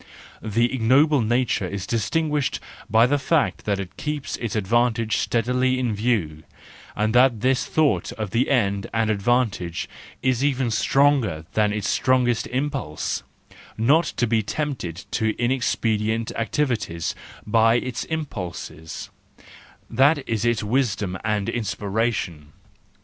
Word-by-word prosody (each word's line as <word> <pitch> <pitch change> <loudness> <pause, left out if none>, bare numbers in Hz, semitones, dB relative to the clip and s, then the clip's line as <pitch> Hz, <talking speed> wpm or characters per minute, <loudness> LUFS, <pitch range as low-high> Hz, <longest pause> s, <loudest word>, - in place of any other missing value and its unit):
The 115 +3 +1
ignoble 135 +4 +4
nature 120 -3 +1
is 100 0 -5
distinguished 145 +6 0 0.3
by 115 +2 +5
the 145 +3 +1
fact 150 +3 0
that 100 -2 0
it 95 -1 -7
keeps 150 -2 -3
its 115 -1 -4
advantage 115 +2 +1
steadily 125 +2 +1
in 125 -3 0
view, 100 -9 -1 0.5
and 110 +1 0
that 125 -3 +4
this 130 0 +1
thought 140 - +1
of 105 -3 -5
the 120 +5 +1
end 100 -7 +1
and 110 -1 +2
advantage 105 -5 0 0.4
is 130 -1 +1
even 135 -4 +1
stronger 120 - +2
than 105 -1 +2
its 105 -1 -2
strongest 125 -3 +2
impulse: 130 - -2 0.6
not 145 +10 +4
to 120 - +2
be 115 -1 +2
tempted 110 - -4
to 110 -1 0
inexpedient 115 -3 0
activities 115 - -1 0.3
by 115 +1 +4
its 125 0 -2
impulses—that 90 - -6 1.2
is 115 -1 -1
its 120 -2 +1
wisdom 105 -5 0
and 105 -2 0
inspiration. 100 -8 -2
115 Hz, 120 wpm, -23 LUFS, 105-130 Hz, 1.2 s, by